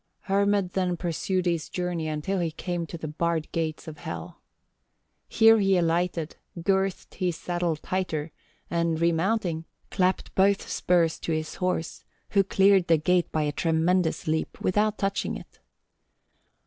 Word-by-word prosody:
"Hermod 200 Hz, -1 st, +1 dB
then 180 Hz, -2 st, 0 dB
pursued 180 Hz, +2 st, -1 dB
his 170 Hz, -3 st, -1 dB
journey 180 Hz, -3 st, -2 dB
until 155 Hz, +5 st, -2 dB
he 170 Hz, -2 st, 0 dB
came 170 Hz, +1 st, -4 dB
to 170 Hz, -, -7 dB
the 160 Hz, -, -5 dB
barred 160 Hz, +1 st, -1 dB
gates 160 Hz, -1 st, -3 dB
of 155 Hz, -1 st, -8 dB
Hel. 85 Hz, -, -7 dB, 0.9 s
Here 225 Hz, 0 st, +6 dB
he 195 Hz, -2 st, +3 dB
alighted, 170 Hz, -1 st, 0 dB, 0.2 s
girthed 190 Hz, +2 st, 0 dB
his 180 Hz, -2 st, -1 dB
saddle 175 Hz, 0 st, -1 dB
tighter, 160 Hz, -2 st, -3 dB, 0.4 s
and 170 Hz, -1 st, 0 dB
remounting, 170 Hz, 0 st, +1 dB, 0.3 s
clapped 185 Hz, 0 st, 0 dB
both 195 Hz, +1 st, +3 dB
spurs 170 Hz, -2 st, +1 dB
to 165 Hz, -, -2 dB
his 155 Hz, 0 st, -3 dB
horse, 180 Hz, -2 st, -2 dB, 0.3 s
who 200 Hz, -1 st, +4 dB
cleared 195 Hz, -1 st, +4 dB
the 165 Hz, -1 st, +5 dB
gate 175 Hz, +3 st, +1 dB
by 155 Hz, -, 0 dB
a 150 Hz, -, 0 dB
tremendous 165 Hz, +3 st, +1 dB
leap 160 Hz, 0 st, -2 dB
without 210 Hz, +3 st, +1 dB
touching 195 Hz, 0 st, -1 dB
it. -, -, -15 dB
175 Hz, 145 wpm, -26 LUFS, 160-190 Hz, 0.9 s, Here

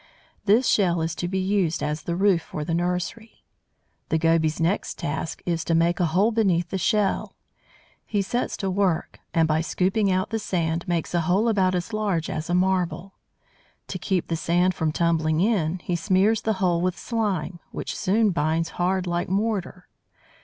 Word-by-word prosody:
This 225 Hz, +5 st, +4 dB
shell 175 Hz, -4 st, +3 dB
is 165 Hz, 0 st, -2 dB
to 175 Hz, -, -3 dB
be 190 Hz, +2 st, -2 dB
used 190 Hz, -3 st, 0 dB
as 150 Hz, +1 st, -2 dB
the 170 Hz, +2 st, -3 dB
roof 190 Hz, -2 st, +3 dB
for 150 Hz, -1 st, -6 dB
the 165 Hz, -, -2 dB
nursery. 180 Hz, +6 st, -3 dB, 0.7 s
The 160 Hz, -, +2 dB
Goby's 160 Hz, -1 st, +2 dB
next 170 Hz, +5 st, 0 dB
task 145 Hz, +2 st, -4 dB
is 170 Hz, -2 st, -1 dB
to 165 Hz, -, +1 dB
make 170 Hz, +2 st, +2 dB
a 175 Hz, -, +3 dB
hole 190 Hz, +8 st, +2 dB
beneath 185 Hz, -7 st, +1 dB
the 190 Hz, -, -1 dB
shell. 210 Hz, +1 st, 0 dB, 0.7 s
He 205 Hz, -2 st, 0 dB
sets 240 Hz, +6 st, -2 dB
to 195 Hz, -1 st, -2 dB
work 185 Hz, -4 st, 0 dB
and, 165 Hz, -1 st, +3 dB
by 155 Hz, 0 st, +1 dB
scooping 190 Hz, +4 st, +1 dB
out 185 Hz, +3 st, 0 dB
the 225 Hz, -, -1 dB
sand, 170 Hz, -5 st, -2 dB
makes 170 Hz, -2 st, -1 dB
a 175 Hz, -, +2 dB
hole 185 Hz, +7 st, +2 dB
about 190 Hz, -4 st, +2 dB
as 180 Hz, +5 st, -3 dB
large 200 Hz, -7 st, -1 dB
as 155 Hz, +2 st, -4 dB
a 175 Hz, -, +2 dB
marble. 185 Hz, 0 st, 0 dB, 0.8 s
To -, -, -4 dB
keep 185 Hz, -4 st, 0 dB
the 165 Hz, -, -1 dB
sand 175 Hz, +3 st, +2 dB
from 160 Hz, -2 st, -1 dB
tumbling 160 Hz, -1 st, +1 dB
in, 185 Hz, -4 st, +1 dB
he 175 Hz, -, -1 dB
smears 195 Hz, +5 st, +2 dB
the 220 Hz, -, 0 dB
hole 180 Hz, -3 st, +1 dB
with 185 Hz, 0 st, -1 dB
slime, 195 Hz, -7 st, -2 dB
which -, -, -5 dB
soon 210 Hz, +2 st, +2 dB
binds 165 Hz, 0 st, 0 dB
hard 185 Hz, +1 st, +1 dB
like 175 Hz, 0 st, -2 dB
mortar. 195 Hz, -2 st, -2 dB
180 Hz, 180 wpm, -24 LUFS, 165-195 Hz, 0.8 s, This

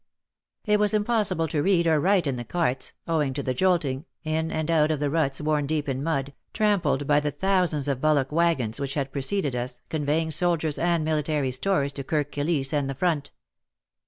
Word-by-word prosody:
It 210 Hz, -1 st, +3 dB
was 210 Hz, +1 st, +2 dB
impossible 210 Hz, -6 st, +1 dB
to 150 Hz, -, 0 dB
read 180 Hz, 0 st, +3 dB
or 160 Hz, -2 st, +3 dB
write 185 Hz, +2 st, +2 dB
in 140 Hz, -3 st, -1 dB
the 120 Hz, -, -5 dB
carts, 135 Hz, -1 st, -1 dB
owing 150 Hz, -5 st, 0 dB
to 140 Hz, -, -3 dB
the 130 Hz, -, -1 dB
jolting, 155 Hz, -4 st, +1 dB, 0.2 s
in 160 Hz, +1 st, -1 dB
and 155 Hz, +1 st, -1 dB
out 155 Hz, -2 st, +3 dB
of 155 Hz, -2 st, 0 dB
the 145 Hz, -1 st, -1 dB
ruts 140 Hz, -4 st, 0 dB
worn 150 Hz, -1 st, 0 dB
deep 150 Hz, 0 st, -1 dB
in 135 Hz, -1 st, -2 dB
mud, 140 Hz, -3 st, -2 dB, 0.2 s
trampled 205 Hz, -10 st, +1 dB
by 145 Hz, +1 st, +4 dB
the 150 Hz, 0 st, -1 dB
thousands 180 Hz, -4 st, +1 dB
of 135 Hz, -2 st, -1 dB
bullock 150 Hz, -3 st, +2 dB
waggons 150 Hz, -8 st, +1 dB
which 140 Hz, -1 st, -3 dB
had 140 Hz, -2 st, -2 dB
pre 140 Hz, -, -3 dB
ceded 145 Hz, -1 st, 0 dB
us, 125 Hz, 0 st, -4 dB
conveying 155 Hz, +1 st, 0 dB
soldiers 160 Hz, -2 st, +1 dB
and 170 Hz, -2 st, +1 dB
military 150 Hz, -3 st, 0 dB
stores 140 Hz, +1 st, 0 dB
to 140 Hz, 0 st, -6 dB
Kirk 145 Hz, 0 st, -1 dB
Kilisse 145 Hz, -1 st, 0 dB
and 145 Hz, -2 st, 0 dB
the 135 Hz, -, -3 dB
front. 160 Hz, -1 st, 0 dB
150 Hz, 200 wpm, -25 LUFS, 140-170 Hz, 0.2 s, by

